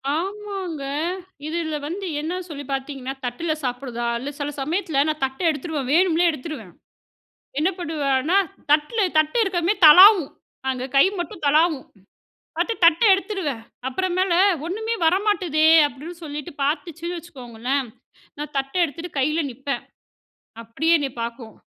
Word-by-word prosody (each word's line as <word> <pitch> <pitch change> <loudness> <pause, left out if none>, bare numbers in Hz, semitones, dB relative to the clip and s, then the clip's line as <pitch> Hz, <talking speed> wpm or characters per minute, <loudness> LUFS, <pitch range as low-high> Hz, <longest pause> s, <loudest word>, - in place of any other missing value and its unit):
ஆமாங்க. 385 -3 -4 0.6
இதில 320 -1 -2
வந்து 380 +5 -5 0.2
என்ன 350 +4 -3
சொல்லி 285 -2 -7
பாத்தீங்கன்னா, 270 -1 -4
தட்ல 245 +7 -3
சாப்பிடுதா 245 -1 -3
இல்ல, 265 +4 -5
சில 285 0 -2
சமயத்தில 315 -1 0
நான் 305 -2 -2
தட்ட 265 0 -7
எடுத்துருவேன், 295 -4 -3
வேணும்னே 350 0 +3
எடுத்துருவேன். 310 +1 -8 0.9
என்ன 320 +5 +2
பண்ணுவேன்னா, 300 0 0 0.3
தட்ல 300 +10 +2 0.2
தட்ட 310 0 +1
இருக்குறமே 355 -2 +1
தளாவும், 365 0 +9 0.4
அங்க 255 -1 -2
கை 275 - +7
மட்டும் 340 -1 -6
தளாவும், 310 -1 +3 0.7
பாத்து 460 - 0
தட்ட 335 -1 +5
எடுத்துருவேன். 380 - -2 0.3
அப்புறம் 355 +7 -2
மேல 375 -1 +2 0.3
ஒண்ணுமே 440 +6 -2
வர 325 +3 +4
மாட்டுதே. 330 -7 +2 0.2
அப்பிடின்னு 325 +5 -10
சொல்லிட்டு, 295 -2 -6
பாத்துச்சுன்னு 335 +4 -3
வச்சுக்கோங்களேன், 255 -3 -4 0.5
நான் 295 0 -6
தட்ட 270 0 -4
எடுத்துட்டு 335 +3 -6
கையில 305 +5 +1
நிப்பேன். 270 +3 -4 0.8
அப்படியே 320 +9 +1
என்னை 275 -2 -2
பாக்கும், 230 -1 -6
310 Hz, 125 wpm, -22 LUFS, 275-350 Hz, 0.9 s, தளாவும்